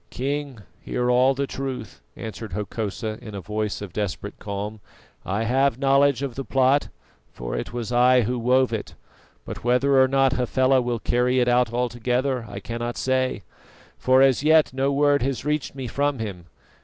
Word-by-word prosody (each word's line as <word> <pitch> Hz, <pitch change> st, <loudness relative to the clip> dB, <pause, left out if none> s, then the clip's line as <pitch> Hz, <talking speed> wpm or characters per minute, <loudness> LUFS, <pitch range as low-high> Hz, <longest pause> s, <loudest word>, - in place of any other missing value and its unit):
"King, 140 Hz, -3 st, -4 dB, 0.2 s
hear 125 Hz, 0 st, -1 dB
all 130 Hz, +2 st, +4 dB
the 140 Hz, +1 st, -1 dB
truth," 130 Hz, -4 st, -6 dB
answered 110 Hz, -3 st, -7 dB
Hokosa 105 Hz, +1 st, -4 dB
in 105 Hz, -2 st, -8 dB
a -, -, -4 dB
voice 105 Hz, +1 st, -3 dB
of 95 Hz, -4 st, -9 dB
desperate 100 Hz, 0 st, -4 dB
calm. 105 Hz, +1 st, -5 dB, 0.4 s
"I 100 Hz, +4 st, -2 dB
have 130 Hz, +2 st, +2 dB
knowledge 140 Hz, 0 st, +3 dB
of 135 Hz, -3 st, -3 dB
the 135 Hz, -, -5 dB
plot, 135 Hz, +2 st, +2 dB, 0.4 s
for -, -, -5 dB
it -, -, -4 dB
was 120 Hz, -1 st, -4 dB
I 125 Hz, +1 st, +5 dB
who 120 Hz, +2 st, -1 dB
wove 125 Hz, +1 st, +2 dB
it; 110 Hz, -, -5 dB, 0.5 s
but -, -, -7 dB
whether 130 Hz, +3 st, +3 dB
or 130 Hz, -, +5 dB
not 135 Hz, 0 st, +2 dB
Hafela 130 Hz, +1 st, +2 dB
will 120 Hz, -1 st, -1 dB
carry 125 Hz, +2 st, +1 dB
it 125 Hz, -, +2 dB
out 125 Hz, -1 st, +3 dB
altogether 125 Hz, +1 st, -1 dB
I 100 Hz, -, -6 dB
cannot 120 Hz, +3 st, -5 dB
say, 130 Hz, 0 st, 0 dB, 0.5 s
for 130 Hz, +1 st, +4 dB
as 135 Hz, -2 st, +3 dB
yet 155 Hz, -1 st, +4 dB
no 135 Hz, +1 st, 0 dB
word 145 Hz, 0 st, +3 dB
has 135 Hz, +1 st, -2 dB
reached 150 Hz, -2 st, -2 dB
me 135 Hz, -2 st, -5 dB
from 140 Hz, +3 st, -1 dB
him. 100 Hz, -7 st, -6 dB
125 Hz, 175 wpm, -24 LUFS, 115-135 Hz, 0.5 s, I